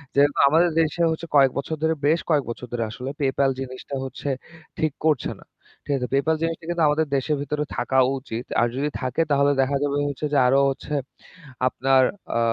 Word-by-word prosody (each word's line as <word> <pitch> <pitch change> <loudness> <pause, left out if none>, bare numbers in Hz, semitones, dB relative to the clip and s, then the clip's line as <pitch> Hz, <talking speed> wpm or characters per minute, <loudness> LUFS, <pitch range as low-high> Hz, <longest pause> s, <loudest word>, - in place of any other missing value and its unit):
যেহেতু 145 +1 +4
আমাদের 165 +4 +4
দেশে 160 +2 -1
হচ্ছে 160 +1 -4
কয়েক 135 -2 +6
বছর 140 +3 -2
ধরে 160 0 +3
বেশ 160 +3 +3
কয়েক 150 -3 +3
বছর 120 +1 -6
ধরে 120 -1 -1
আসলে 125 +4 -6
PayPal 135 0 +2
জিনিসটা 130 +1 -6
হচ্ছে 135 +2 -5 0.5
ঠিক 155 -3 0
করছে 150 -6 +1
না। - - -17 0.4
ঠিক 145 - -1
আছে 125 -1 -3
PayPal 150 +4 +2
জিনিসটা 165 0 -2
কিন্তু 175 -1 0
আমাদের 155 +1 +1
দেশের 140 +3 0
ভেতরে 150 +1 -2
থাকা 125 +2 0 0.2
উচিত। 120 -2 -6 0.2
আর 120 - +3
যদি 145 +3 -1
থাকে 130 +4 -1
তাহলে 140 0 +4
দেখা 135 +1 +1
যাবে 145 -1 0 0.4
যে - - +4
আরো 135 +2 +4
হচ্ছে 135 +2 -5 0.7
আপনার 130 +1 +3 0.3
আ - - +2
140 Hz, 185 wpm, -23 LUFS, 130-155 Hz, 0.7 s, কয়েক